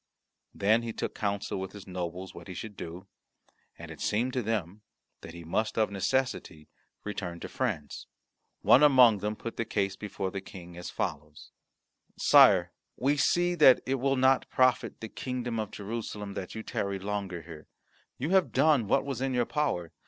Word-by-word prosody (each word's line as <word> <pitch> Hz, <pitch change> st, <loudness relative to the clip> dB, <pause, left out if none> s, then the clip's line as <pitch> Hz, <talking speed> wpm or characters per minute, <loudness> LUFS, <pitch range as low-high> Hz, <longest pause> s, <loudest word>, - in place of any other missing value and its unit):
Then 110 Hz, +4 st, +3 dB
he 115 Hz, -1 st, -5 dB
took -, -, -4 dB
counsel 100 Hz, -2 st, -2 dB
with 95 Hz, 0 st, -6 dB
his 105 Hz, -2 st, -10 dB
nobles 90 Hz, 0 st, -5 dB
what 85 Hz, 0 st, -11 dB
he 95 Hz, -, -7 dB
should 105 Hz, +3 st, -7 dB
do, 85 Hz, +3 st, -8 dB, 0.7 s
and -, -, -9 dB
it -, -, -10 dB
seemed 120 Hz, +5 st, 0 dB
to 130 Hz, -, 0 dB
them 105 Hz, -3 st, -3 dB, 0.4 s
that 85 Hz, -, -10 dB
he 85 Hz, -, -9 dB
must 105 Hz, +8 st, -1 dB
of 110 Hz, -2 st, +2 dB
necessity 100 Hz, -, -2 dB, 0.3 s
return 95 Hz, -5 st, -5 dB
to -, -, -5 dB
France. 95 Hz, -, -4 dB, 0.6 s
One 130 Hz, -, +7 dB
among 125 Hz, -7 st, +6 dB
them 105 Hz, +2 st, -2 dB
put 115 Hz, +2 st, -7 dB
the -, -, 0 dB
case 100 Hz, -3 st, -1 dB
before 100 Hz, -2 st, -4 dB
the 95 Hz, -, -4 dB
King 90 Hz, -2 st, -11 dB
as 90 Hz, 0 st, -7 dB
follows: 75 Hz, +1 st, -5 dB, 0.7 s
"Sire, -, -, +6 dB, 0.3 s
we 140 Hz, +3 st, +2 dB
see 175 Hz, +5 st, +2 dB
that 150 Hz, -7 st, +7 dB
it 135 Hz, +1 st, -1 dB
will 135 Hz, +2 st, +1 dB
not 130 Hz, 0 st, +3 dB
profit 130 Hz, -1 st, +1 dB
the 110 Hz, -, -5 dB
kingdom 125 Hz, 0 st, -4 dB
of 110 Hz, -2 st, -3 dB
Jerusalem 105 Hz, -1 st, -6 dB
that 95 Hz, -, -6 dB
you 110 Hz, -, -5 dB
tarry 100 Hz, -2 st, -2 dB
longer 95 Hz, -3 st, -4 dB
here. 80 Hz, -2 st, -11 dB, 0.5 s
You 150 Hz, +7 st, -2 dB
have 190 Hz, -1 st, +3 dB
done 145 Hz, -9 st, +3 dB
what -, -, +2 dB
was 135 Hz, -2 st, -4 dB
in 135 Hz, -1 st, -1 dB
your 120 Hz, -1 st, +2 dB
power. 125 Hz, -, -1 dB
105 Hz, 180 wpm, -29 LUFS, 95-130 Hz, 0.7 s, One